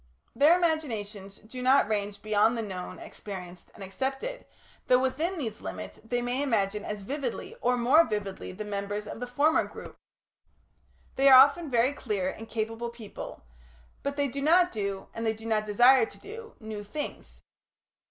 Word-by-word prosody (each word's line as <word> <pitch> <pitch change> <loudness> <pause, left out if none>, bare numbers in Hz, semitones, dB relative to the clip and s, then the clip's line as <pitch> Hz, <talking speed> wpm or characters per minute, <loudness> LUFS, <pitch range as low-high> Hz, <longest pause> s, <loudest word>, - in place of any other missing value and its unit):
Their 295 +7 +6
imaginations 220 - -2
do 240 +4 -9
not 260 0 +4
range 205 -1 -2
beyond 215 +2 +3
the 225 - -2
known, 185 -3 -6
experienced, 180 -3 -9
and - - -9
accepted, 270 - -4 0.4
though 250 - +6
within 295 +8 -1
these 225 -8 -4
limits - - -7
they 245 +2 -2
may 245 +3 -1
imagine 210 -6 0
as 210 -1 -5
vividly 270 +2 -4
or 250 +1 +2
more 260 +7 +6
vividly 200 -2 -4
than 210 +3 -7
members 205 +1 -3
of 210 - -7
the 245 - -4
former 290 +6 +3
group. - - -10 1.2
They 275 +1 +6
are 260 - +10
often 285 +4 +5
very 245 +2 +3
clever 205 -9 -2
and 225 +3 -8
capable 225 +1 -3
people, 235 - -9 0.6
but 280 0 -3
they 285 -1 +2
do 275 +2 -5
not 350 +5 +4
do, 200 -2 -3
and 230 - -5
they 220 -1 +1
do 220 +1 -12
not 215 -1 +1
desire 240 +3 +5
to - - -14
do, 450 +2 -10
new 215 -2 -6
things. 295 +9 -7
230 Hz, 170 wpm, -28 LUFS, 210-275 Hz, 1.2 s, are